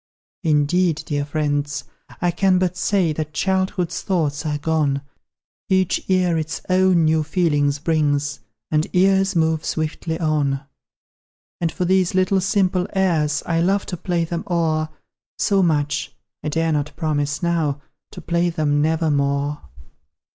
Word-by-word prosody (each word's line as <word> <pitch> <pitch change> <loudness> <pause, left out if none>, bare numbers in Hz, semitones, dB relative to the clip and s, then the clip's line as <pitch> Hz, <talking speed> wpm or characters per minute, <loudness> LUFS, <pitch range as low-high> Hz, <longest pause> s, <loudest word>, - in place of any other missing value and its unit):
"Indeed, 160 +2 +2
dear 145 -3 -1
friends, 145 0 -1 0.4
I 175 - +2
can 185 +1 +2
but 180 -1 0
say 180 -3 +1
That 155 0 -4
childhood's 190 -1 0
thoughts 155 -5 -1
are 150 -1 -1
gone; 145 -2 0 0.7
Each 190 -1 +2
year 180 -3 +2
its 155 0 -4
own 185 -3 +4
new 155 0 +3
feelings 145 -3 +1
brings, 145 -2 0 0.3
And 155 0 +2
years 195 +1 +3
move 160 -1 +1
swiftly 160 +1 -3
on: 145 -4 0 1.0
"And 165 -2 0
for 180 - -2
these 185 0 +2
little 185 +1 +2
simple 185 -1 +1
airs 165 -6 +1
I 165 -1 +1
love 195 +3 +1
to 180 - -4
play 170 -1 -1
them 170 0 -4
o'er 160 -2 +1 0.5
So 200 -2 +2
much 150 -4 0 0.3
I 150 - -1
dare 165 +1 0
not 150 -1 -2
promise, 150 -1 -1
now, 160 -5 0 0.3
To - - -8
play 170 0 +1
them 150 -3 +1
never 160 +1 +1
more." 140 +1 0
160 Hz, 140 wpm, -21 LUFS, 150-180 Hz, 1.0 s, own